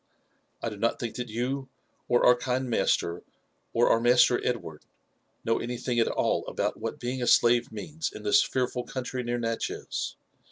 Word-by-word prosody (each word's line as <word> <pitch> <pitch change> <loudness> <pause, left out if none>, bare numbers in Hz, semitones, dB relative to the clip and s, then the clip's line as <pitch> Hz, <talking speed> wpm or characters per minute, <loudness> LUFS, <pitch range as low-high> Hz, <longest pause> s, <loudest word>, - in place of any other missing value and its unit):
I - - 0
do 105 - -8
not 115 +3 +1
think 120 -2 -4
that 125 -1 -4
you, 130 +4 -2 0.4
or 120 - +4
our 125 - +7
kind 125 +1 -2
master, 85 -7 +1 0.5
or 120 +1 +3
our 115 - +4
Master 125 +1 +4
Edward, 105 -11 -3 0.6
know 115 - +2
anything 120 0 -2
at 115 - +3
all - - 0
about - - -2
what - - -5
being 125 +1 -3
a 120 - -1
slave 120 0 +4
means 150 +9 -4
in 105 - -10
this 105 - +5
fearful 125 -1 -1
country 130 +1 -4
near 120 0 -2
Natchez. 115 -1 -3
120 Hz, 170 wpm, -28 LUFS, 115-125 Hz, 0.6 s, our